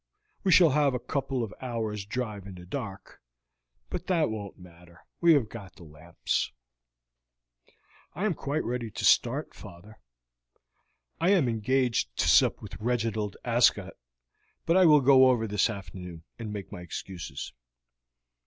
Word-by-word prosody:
We 190 - +2
shall 170 -4 +7
have 140 -2 +2
a - - -1
couple 130 0 -2
of 110 -2 -6
hours' 110 -5 -3
drive 105 -4 -4
in 95 - -9
the 90 0 -11
dark, 100 -2 -7 0.7
but 180 0 -5
that 165 -9 +1
won't 100 -3 -7
matter, 85 -1 -17
we 170 -1 +6
have 135 -7 +2
got 105 -4 -11
the - - -14
lamps." 80 +2 -3 1.6
"I 195 - -2
am 210 - +1
quite 145 0 -3
ready 120 -1 -3
to - - -4
start, - - +2
father. 100 +6 -13 1.2
I 170 +3 +2
am 185 -9 +4
engaged 115 - 0
to - - +1
sup - - +4
with - - -9
Reginald 110 -3 -1
Ascot, - - +2 0.7
but 165 - +2
I 185 -1 +6
will 150 -3 +6
go 130 0 +6
over 120 -3 +1
this 105 +1 +1
afternoon 90 -5 -8 0.2
and 110 -2 -5
make 100 -2 -7
my 90 - -8
excuses." 90 +1 -7
115 Hz, 150 wpm, -28 LUFS, 95-135 Hz, 1.6 s, shall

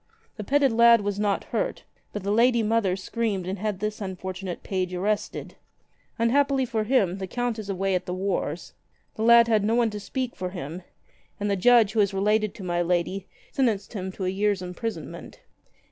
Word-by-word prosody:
The 210 - -5
petted 275 +3 +3
lad 235 0 +6
was 205 0 -2
not 205 -1 0
hurt, - - -3 0.3
but 210 - -5
the 200 - -1
lady 235 +1 +4
mother 215 -4 +1
screamed 200 -1 -2
and 190 +1 -4
had 210 -2 -2
this 215 +1 -3
unfortunate 185 -1 -5
page 185 -2 -2
arrested. 205 +3 -2 0.6
Un 230 0 +2
happily 275 -1 +2
for 220 -3 -2
him, 200 -7 +2
the 190 - -4
Count 245 +1 -2
is 205 -2 -7
away 195 0 0
at 180 0 -1
the 180 - -2
wars. 185 -4 -3 0.4
The - - -7
lad 235 +1 +7
had 220 -3 +2
no 220 +2 +2
one 235 -2 +2
to 210 - -5
speak 250 +4 -4
for 185 - -4
him, 175 -1 -6 0.6
and 205 0 -1
the - - +2
judge, 225 +1 +5
who 225 - 0
is 200 -1 +2
related 210 +1 +1
to 195 - -9
my 175 -1 0
lady, 180 +2 -1 0.2
sentenced 225 -8 0
him 190 -3 -4
to 190 - -4
a - - +1
year's 200 0 0
imprisonment." 180 +6 -6
205 Hz, 195 wpm, -25 LUFS, 190-230 Hz, 0.6 s, lad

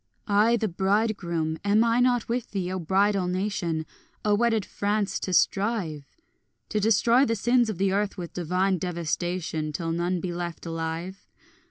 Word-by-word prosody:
I 215 +3 +4
the 220 - 0
bridegroom, 185 -4 0
am 205 +2 +4
I 230 +1 +2
not 245 -2 +2
with 240 0 -2
thee, 185 -3 -3
O 185 - -2
bridal 190 +2 +2
nation, 180 -4 -2 0.4
O 210 - +3
wedded 225 -1 +2
France, 205 0 -1
to 185 - -4
strive? 185 -7 0 0.5
To 215 - 0
destroy 225 +4 +4
the 230 -4 +1
sins 240 +2 +2
of 210 - -3
the 195 +1 +1
earth 205 +1 -1
with 175 -2 -6
divine 180 +2 0
devastation, 170 -2 -2
Till 165 +2 -3
none 175 +2 -1
be 175 +1 -4
left 175 -1 -5
alive? 165 +3 -5
190 Hz, 160 wpm, -26 LUFS, 170-215 Hz, 0.5 s, I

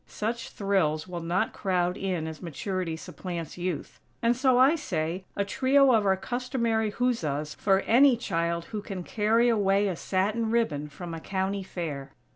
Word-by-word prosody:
Such 230 +2 -3
thrills 185 -6 0
will 175 -1 -5
not 180 +6 0
crowd 180 -2 0
in 185 -4 -2
as 160 -1 -7
Maturity 175 0 -3
supplants 170 0 -6
Youth; 180 -3 -4 0.2
and 235 +1 +4
so 255 0 +3
I 265 +4 +6
say, 180 - -2
"a 200 - 0
trio 265 +4 +4
of 215 -3 +3
our 190 0 +3
customary 235 0 -1
huzzas" 155 - -1
for 195 -1 +2
any 255 +1 +5
child 170 -5 -1
who 210 - -2
can 195 -3 -6
carry 225 +5 +2
away 205 -3 +3
a 185 - -1
satin 205 +6 0
ribbon 155 -11 0
from 170 +4 -8
a 165 - -5
County 195 +3 -2
Fair. 150 -7 -5
195 Hz, 165 wpm, -27 LUFS, 170-230 Hz, 0.2 s, I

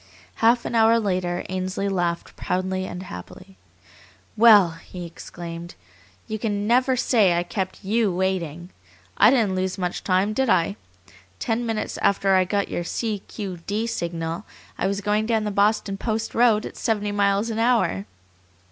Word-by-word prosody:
Half 235 +2 +3
an - - -3
hour 230 0 +5
later 180 -4 -1
Ainsley 185 +1 -2
laughed 175 -3 -2
proudly 185 +1 -2
and 180 +1 -6
happily. 185 - -10 0.8
"Well!" 210 -6 +7
he 180 -1 -8
exclaimed, 170 0 -8 0.5
"you 220 0 -4
can 205 -2 -1
never 255 +3 +3
say 210 -8 +3
I 175 - +1
kept 190 +2 -4
YOU 215 0 +2
waiting. 175 -2 -2 0.5
I 210 - +7
didn't 230 -7 +2
lose 185 0 -2
much 180 -2 -3
time, 190 +3 +1
did 265 +1 0
I? 185 +1 +2 0.6
Ten 235 0 -1
minutes 225 -1 -3
after 195 0 +2
I 185 -1 +4
got 200 +2 0
your 175 - -3
C. 215 +4 -2
Q. 195 -5 -6
D. 215 +3 -1
signal 170 -3 -3 0.3
I - - -1
was 200 +1 -2
going 210 +2 0
down 225 -2 +1
the 210 - -2
Boston 200 0 +1
Post 220 +1 -2
Road 225 -2 +3
at - - -8
seventy 210 -3 -1
miles 205 +2 +1
an 220 - -3
hour." 225 - +1
200 Hz, 160 wpm, -23 LUFS, 185-220 Hz, 0.8 s, Well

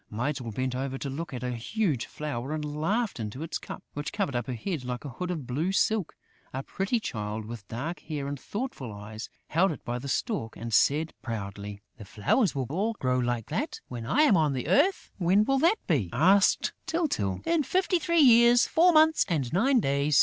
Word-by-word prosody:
Mytyl 120 +2 -2
bent 130 +3 -2
over 135 +1 -3
to 135 0 -4
look 160 +5 -5
at 125 -2 -5
a 125 - -1
huge 140 - -1
flower 145 -2 -4
and 155 -1 -3
laughed 165 - -1
into 110 +7 -5
its 165 - -3
cup, - - -8
which 145 0 -4
covered 140 - -2
up 120 - -2
her 130 - -3
head 150 - -3
like 125 +2 -5
a - - -4
hood 180 +9 -5
of 160 -7 -3
blue 150 +10 -1
silk. 210 -1 +1 0.4
A 135 - -3
pretty 195 - -1
Child, 105 - -4
with 110 -2 -8
dark 145 +10 -4
hair 145 -3 -5
and 140 -1 -4
thoughtful 205 - -5
eyes, 105 +2 -8 0.2
held 180 +4 +3
it 145 - -8
by 120 +1 -2
the 140 - -7
stalk 140 - -2
and 115 0 -6
said, 155 +7 +3
proudly: 100 -3 -6
"The 105 - -10
flowers 115 - +1
will 135 -2 -1
all 205 +8 0
grow 130 -10 0
like 120 -2 -1
that, - - -2
when 120 -2 -6
I 300 - +4
am 285 -10 +5
on 150 -5 +2
earth!" 355 - +2
"When 190 +4 +4
will 270 +2 +2
that 340 +9 +4
be?" 130 - +1
asked 195 +5 +4
Tyltyl. 295 - -1
"In 335 -2 +2
fifty 365 +4 +1
three 335 +1 +3
years, 240 -2 +7
four 350 +2 +4
months 315 0 +5
and 145 -7 -1
nine 255 +8 +4
days." 140 -3 +2
145 Hz, 205 wpm, -28 LUFS, 120-205 Hz, 0.4 s, years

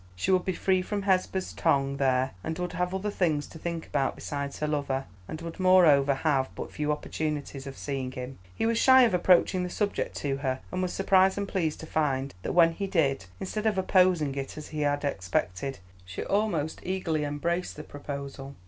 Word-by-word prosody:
She 90 - 0
would 185 -1 +3
be 185 - 0
free 185 +1 +1
from 200 +2 -3
Hesba's 190 -1 0
tongue 140 -3 +1
there, 130 -1 +2
and 160 0 -3
would 180 0 -3
have 180 +1 -1
other 190 +2 -2
things 155 -7 0
to 160 - -12
think 170 0 -4
about 135 -2 0
besides 140 -1 -4
her 150 - -1
lover, 140 -3 -1 0.2
and 155 - -6
would 165 +2 -7
moreover 160 -7 +5
have 135 -2 +1
but - - -6
few 150 0 -1
opportunities 150 -2 -3
of 135 - -8
seeing 135 -3 -3
him. 125 -1 -7 0.2
He - - -1
was 230 0 +2
shy 260 -1 +7
of 235 - +3
approaching 180 +1 +4
the 180 - -2
subject 205 +3 -2
to 135 -2 -1
her, 130 -2 -2
and 185 - -2
was 180 -1 -1
surprised 190 0 +3
and 200 0 -2
pleased 165 -6 -1
to - - -7
find 140 -4 -1
that - - -3
when 170 -1 +6
he 195 +4 -4
did, 145 - +1
instead 215 +3 -2
of 215 - +1
opposing 180 -6 +3
it 135 +1 -5
as 155 - -8
he 155 -1 -4
had 145 0 0
expected, 90 - -2 0.3
she 90 0 -6
almost 190 -7 0
eagerly 175 -5 -1
embraced 170 +5 -2
the 150 - -7
proposal. 140 -1 -7
155 Hz, 200 wpm, -28 LUFS, 140-185 Hz, 0.3 s, shy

